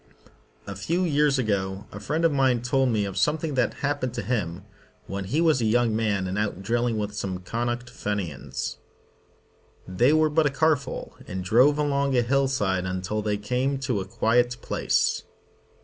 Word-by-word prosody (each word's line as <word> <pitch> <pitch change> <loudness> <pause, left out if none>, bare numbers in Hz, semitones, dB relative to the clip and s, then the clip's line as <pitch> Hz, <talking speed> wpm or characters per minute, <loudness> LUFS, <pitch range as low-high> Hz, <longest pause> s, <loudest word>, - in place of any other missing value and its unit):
A 100 - -6
few 170 - -1
years 150 -4 +2
ago 100 -4 -1
a 100 - -7
friend 155 +11 -1
of 165 - +4
mine 130 -4 +2
told 130 +1 +2
me 110 -3 +1
of 95 -1 -5
something 150 - +1
that 125 -2 +1
happened 140 -4 -1
to 120 - -3
him 95 -7 -2 0.4
when 100 0 -4
he 140 +12 0
was 160 -6 +3
a - - +1
young 115 0 +2
man 105 -4 0
and 95 +2 -2
out 100 -2 -2
drilling 120 +2 0
with 105 -1 -3
some 100 -3 -3
Connaught 120 +6 -3
Fenians. 85 - -4 1.1
They 105 +9 +3
were 155 0 +3
but 155 0 +3
a - - +2
car 155 +3 +3
full, 140 -2 -7
and 95 0 -4
drove 125 +10 +4
along 140 -2 +1
a 120 - +4
hill 135 +3 +2
side 95 -8 0
until 95 +3 -2
they 105 -1 -1
came 125 +6 -1
to 125 -6 0
a - - -5
quiet 120 +4 +1
place. - - +1
120 Hz, 180 wpm, -25 LUFS, 100-135 Hz, 1.1 s, of